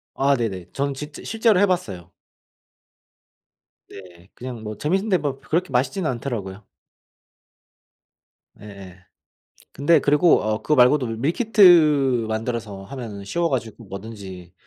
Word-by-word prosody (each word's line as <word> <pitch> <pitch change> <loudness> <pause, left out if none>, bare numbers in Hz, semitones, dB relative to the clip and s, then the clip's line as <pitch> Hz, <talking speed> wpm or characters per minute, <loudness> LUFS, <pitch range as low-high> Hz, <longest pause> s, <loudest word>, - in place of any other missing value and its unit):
아. 140 +1 +2
네네. 100 -8 -4
전 140 0 -2
진짜 150 +2 -9
실제로 220 -3 +2
해봤어요. 115 - -1 1.8
네. 90 -1 -14
그냥 120 -3 -8
뭐 105 -1 -7
재밌는데 190 +5 0
뭐 145 -3 -4
그렇게 170 +1 -2
맛있지는 145 +7 0
않더라고요. 110 -6 -5 2.0
예예. 95 -3 -12 0.7
근데 150 +2 +3
그리고 150 +4 +3
어 110 0 -2
그거 150 - +1
말고도 125 +1 +4
밀키트 150 - +4
만들어서 110 -3 -4
하면은 110 -4 -8
쉬워가지고 120 -6 -3
뭐든지 95 -3 -10
125 Hz, 265 characters per minute, -22 LUFS, 105-150 Hz, 2.0 s, 말고도